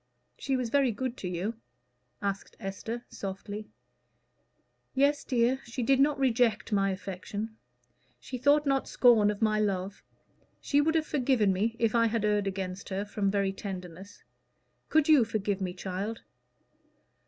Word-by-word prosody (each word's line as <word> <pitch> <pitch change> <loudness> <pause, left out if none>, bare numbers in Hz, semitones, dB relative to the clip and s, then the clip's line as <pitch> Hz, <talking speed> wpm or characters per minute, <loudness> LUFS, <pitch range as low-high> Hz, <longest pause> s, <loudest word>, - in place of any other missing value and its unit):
"She 270 -1 0
was 245 -3 -3
very 275 -2 +3
good 255 +3 -3
to 185 - -5
you?" 190 +6 -3 0.6
asked 200 0 -3
Esther, 225 +4 -5
softly. 205 +2 -6 1.3
"Yes, 280 +1 +3
dear. 250 0 +2
She 240 +1 -4
did 270 +2 +3
not 290 +1 +3
reject 240 -4 +2
my 195 -1 +2
affection. 200 +3 -5 0.6
She 255 - -6
thought 290 +3 +4
not 275 -1 +1
scorn 230 -5 +5
of 210 +1 -2
my 215 -1 +2
love. 195 -1 -1 0.6
She 285 0 +2
would 320 +2 +1
have 315 -1 +2
forgiven 250 -9 +2
me, 220 +5 0
if 230 -2 +1
I 230 -1 +4
had 225 -1 0
erred 210 -1 +1
against 190 0 -4
her, 195 +1 -2
from 205 -1 -1
very 195 -1 0
tenderness. 185 -1 -8 0.7
Could 310 -1 +3
you 300 -6 +7
forgive 210 -3 -2
me, 185 -1 -1
child?" 195 +4 -5
215 Hz, 150 wpm, -29 LUFS, 195-255 Hz, 1.3 s, you